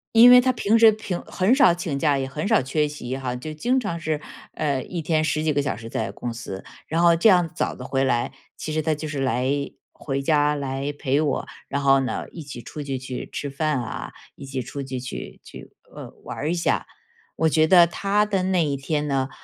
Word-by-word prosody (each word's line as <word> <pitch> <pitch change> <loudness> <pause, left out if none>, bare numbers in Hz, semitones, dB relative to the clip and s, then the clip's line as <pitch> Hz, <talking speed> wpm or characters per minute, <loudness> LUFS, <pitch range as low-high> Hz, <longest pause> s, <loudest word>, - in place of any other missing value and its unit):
因 240 +2 +9
为 250 0 +9
他 255 0 +2
平 225 -2 +2
时 225 -1 +8
平 205 -4 -4
很 195 +8 +2
少 180 -11 +6
请 170 -5 -3
假， 145 -1 +2
也 135 -1 -2
很 150 +5 -4
少 220 - +4
缺 150 +3 0
席 130 -3 -5
哈， 130 -2 -3
就 155 +5 -6
经 250 +12 +1
常 170 -8 -3
是， 155 -2 -2 0.4
呃， 140 -4 -1
一 175 -2 -5
天 155 0 +1
十 155 0 0
几 155 -2 +1
个 145 - +1
小 135 -7 -2
时 115 0 -9
在 110 - -3
公 120 -1 -5
司。 105 -5 -7 0.2
然 165 +2 0
后 170 -1 +6
这 190 +7 +5
样 175 -3 +4
早 - - -1
地 - - -9
回 135 0 0
来， 120 -1 +1 0.3
其 155 - -5
实 155 - +1
他 155 +1 +1
就 155 +1 -5
是 145 -2 -4
来 130 -1 0 0.5
回 140 -1 -3
家 150 0 +2
来 140 0 -3
陪 140 +1 +1
我。 145 -3 -1 0.2
然 140 - -1
后 135 -1 +4
呢， 130 - -3
一 165 - -8
起 130 -4 -8
出 150 +4 -7
去， 135 -2 -3
去 130 0 -6
吃 145 - -4
饭 145 -1 -1
啊， 115 - -6 0.2
一 - - -10
起 135 -1 -4
出 140 +3 -6
去， 130 -1 -5
去 130 - -7
去 - - -12 0.2
呃， - - -8
玩 150 +3 -4
一 - - +1
下。 170 - 0 0.5
我 160 0 +3
觉 155 +1 +4
得 175 0 +7
他 200 +4 +1
的 195 -3 0
那 185 -3 +2
一 140 -1 -1
天 150 +2 -2
呢， 135 -1 0
150 Hz, 245 characters per minute, -23 LUFS, 135-170 Hz, 0.5 s, 因